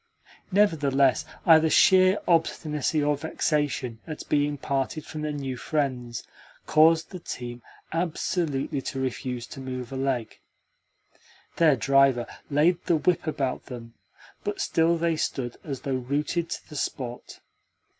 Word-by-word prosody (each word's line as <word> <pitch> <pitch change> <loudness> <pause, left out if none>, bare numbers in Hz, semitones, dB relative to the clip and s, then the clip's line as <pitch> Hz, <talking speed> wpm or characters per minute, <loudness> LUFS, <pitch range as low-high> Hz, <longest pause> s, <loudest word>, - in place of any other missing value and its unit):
Nevertheless, 145 -10 +3 0.2
either 160 -1 +6
sheer 185 +3 +6
obstinacy 155 -3 +1
or 145 0 +2
vexation 145 -5 -1
at 155 -2 -7
being 145 0 +1
parted 140 +3 -2
from 155 - -6
their 150 0 -2
new 135 -3 -4
friends 125 -5 -2 0.4
caused 160 +1 +4
the 185 -3 -7
strange 120 -1 -6
team - - -32 0.3
absolutely 165 -4 -1
to 135 - -4
refuse 125 -2 -3
to 135 - -10
move 130 -2 -6
a - - -5
leg. 130 -4 -2 1.2
Their 160 -4 +5
driver 135 0 +3 0.2
laid 160 +5 +2
the 170 - +3
whip 165 +1 +1
about 135 -4 -2
them, 115 -2 -9 0.5
but - - -3
still 165 +1 +2
they 165 -1 0
stood 125 -5 -2
as 135 -5 -5
though 135 - -2
rooted 150 +6 -1
to - - -6
the 150 - -11
spot. 125 -3 -5
145 Hz, 135 wpm, -26 LUFS, 130-160 Hz, 1.2 s, either